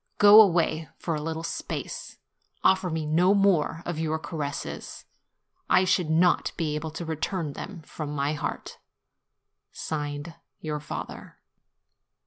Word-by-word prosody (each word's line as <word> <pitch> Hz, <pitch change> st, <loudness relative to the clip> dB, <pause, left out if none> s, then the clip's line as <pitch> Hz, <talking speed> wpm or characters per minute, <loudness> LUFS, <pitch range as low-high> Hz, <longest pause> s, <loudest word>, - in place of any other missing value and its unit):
Go 210 Hz, +1 st, +10 dB
away, 165 Hz, -5 st, +2 dB
for 170 Hz, -, -3 dB
a 150 Hz, -, -2 dB
little 160 Hz, +1 st, -4 dB
space; -, -, -5 dB, 0.5 s
offer 190 Hz, -1 st, +3 dB
me 160 Hz, -1 st, -2 dB
no 175 Hz, +6 st, +4 dB
more 180 Hz, -5 st, +2 dB
of 175 Hz, -3 st, -3 dB
your 160 Hz, -1 st, 0 dB
caresses; 150 Hz, -2 st, -5 dB, 0.6 s
I 185 Hz, +1 st, +5 dB
should 180 Hz, -3 st, +2 dB
not 170 Hz, +2 st, +3 dB
be 155 Hz, -3 st, -1 dB
able 150 Hz, +1 st, -3 dB
to 165 Hz, +2 st, -6 dB
return 160 Hz, 0 st, -2 dB
them 180 Hz, 0 st, -8 dB
from 150 Hz, 0 st, -6 dB
my 145 Hz, 0 st, -1 dB
heart. 150 Hz, -, -5 dB, 1.8 s
YOUR 150 Hz, -1 st, -3 dB
FATHER. 150 Hz, -, -7 dB
160 Hz, 125 wpm, -27 LUFS, 155-180 Hz, 1.8 s, Go